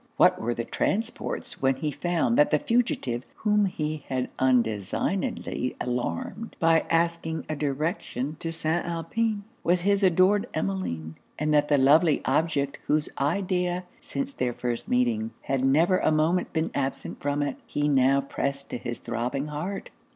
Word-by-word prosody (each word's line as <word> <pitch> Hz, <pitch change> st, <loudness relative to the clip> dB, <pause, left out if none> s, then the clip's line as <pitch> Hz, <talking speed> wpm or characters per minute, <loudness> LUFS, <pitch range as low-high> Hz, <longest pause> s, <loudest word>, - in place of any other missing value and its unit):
What -, -, +5 dB
were 120 Hz, -, 0 dB
his 115 Hz, -, -3 dB
transports, 225 Hz, +4 st, -2 dB
when 135 Hz, 0 st, +3 dB
he 150 Hz, +3 st, -2 dB
found 175 Hz, -, 0 dB
that 295 Hz, +2 st, +5 dB
the -, -, +4 dB
fugitive 235 Hz, -, 0 dB
whom 210 Hz, -1 st, +2 dB
he 155 Hz, -4 st, -3 dB
had 130 Hz, -1 st, -1 dB
undesignedly 125 Hz, -, 0 dB
alarmed 125 Hz, -, -3 dB
by 165 Hz, -1 st, +4 dB
asking 165 Hz, -1 st, 0 dB
a 155 Hz, -, -2 dB
direction 150 Hz, -, -2 dB
to 165 Hz, -, -3 dB
St. 165 Hz, +1 st, -1 dB
Alpin, 205 Hz, +6 st, -1 dB, 0.2 s
was 175 Hz, +1 st, +2 dB
his 200 Hz, +2 st, +2 dB
adored 190 Hz, +2 st, +4 dB
Emmeline; 85 Hz, -5 st, -3 dB, 0.2 s
and 150 Hz, +1 st, 0 dB
that 150 Hz, 0 st, +4 dB
the 145 Hz, -, +4 dB
lovely 150 Hz, +4 st, +5 dB
object 140 Hz, 0 st, +1 dB
whose 150 Hz, 0 st, +1 dB
idea, 180 Hz, +3 st, 0 dB, 0.2 s
since 280 Hz, -1 st, -4 dB
their 125 Hz, -, -1 dB
first 120 Hz, 0 st, -3 dB
meeting, 240 Hz, -3 st, +1 dB
had 135 Hz, -1 st, 0 dB
never 160 Hz, +7 st, +4 dB
a -, -, +2 dB
moment 160 Hz, +4 st, +2 dB
been 160 Hz, 0 st, -1 dB
absent 135 Hz, -1 st, -3 dB
from 145 Hz, 0 st, 0 dB
it, 140 Hz, -2 st, -3 dB
he 145 Hz, 0 st, 0 dB
now 135 Hz, -1 st, +4 dB
pressed 140 Hz, 0 st, -3 dB
to -, -, -3 dB
his 120 Hz, 0 st, -4 dB
throbbing 125 Hz, +5 st, -3 dB
heart? 175 Hz, +7 st, -4 dB
155 Hz, 155 wpm, -26 LUFS, 135-185 Hz, 0.2 s, What